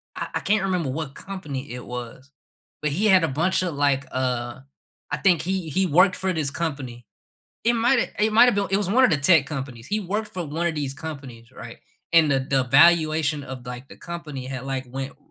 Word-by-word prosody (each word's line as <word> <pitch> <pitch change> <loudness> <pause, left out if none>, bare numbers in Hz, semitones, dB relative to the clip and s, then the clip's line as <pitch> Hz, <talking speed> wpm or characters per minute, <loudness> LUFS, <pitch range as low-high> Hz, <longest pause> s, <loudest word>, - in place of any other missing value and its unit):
I - - -4
I - - +1
can't 210 -1 +1
remember 180 -7 -1
what 145 +1 -4
company 145 -9 -7
it 125 0 -7
was, 125 +2 -8 0.5
but 150 -1 0
he 195 +9 0
had 185 -4 +5
a - - +2
bunch 170 +9 +1
of, 175 -4 -2
like, 140 -1 +1
uh 125 -1 -2 0.5
I - - 0
think 180 -4 +3
he 185 -2 -2
he 190 +5 +1
worked 180 +4 +4
for 190 0 -1
this 155 -4 -1
company, 135 -8 -5 0.6
it 235 - +4
might've 235 +2 +2
it 215 +1 +2
might've 245 +2 +6
been 200 0 0
It 195 - +3
was 205 -3 -1
one 255 +5 +5
of - - +5
the 160 - +3
tech 150 -1 +4
companies, 130 -5 -6
he 210 +6 -1
worked 210 +3 -3
for 180 -2 -2
one 160 +4 -2
of 170 - 0
these 140 -3 -3
companies, 135 -7 -9
right, 115 -2 -10 0.3
and 165 -3 +5
the 135 -1 +2
the 135 0 0
valuation 155 +1 +4
of, 130 -1 -9
like, 125 +2 -8
the - - -13
company 155 -7 -7
had 130 -1 -6
like, 135 -1 -3
went, 135 +2 -5
r - - -27
150 Hz, 220 wpm, -23 LUFS, 135-185 Hz, 0.6 s, might've